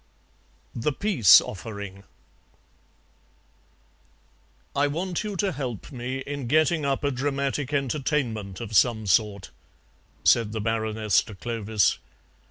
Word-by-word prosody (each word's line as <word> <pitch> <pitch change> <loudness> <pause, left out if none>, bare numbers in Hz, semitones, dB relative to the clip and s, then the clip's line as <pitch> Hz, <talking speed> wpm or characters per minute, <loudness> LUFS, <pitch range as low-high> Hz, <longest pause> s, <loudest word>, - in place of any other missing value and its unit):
THE 120 +5 -1
PEACE 175 - +6
OFFERING 100 -1 -8 2.7
"I 140 +1 +3
want 175 +5 -3
you 210 -2 -4
to 195 +1 0
help 130 - -5
me 130 +1 -4
in 140 -3 -5
getting 155 +3 +2
up 140 0 -1
a 145 - +1
dramatic 140 +1 -2
entertainment 130 - -2
of 110 -2 -5
some 110 -1 +3
sort," 100 +1 +1 0.7
said 110 -2 +3
the 110 - -2
Baroness 110 -2 +1
to 105 - -10
Clovis. 110 -2 0
120 Hz, 110 wpm, -25 LUFS, 110-145 Hz, 2.7 s, PEACE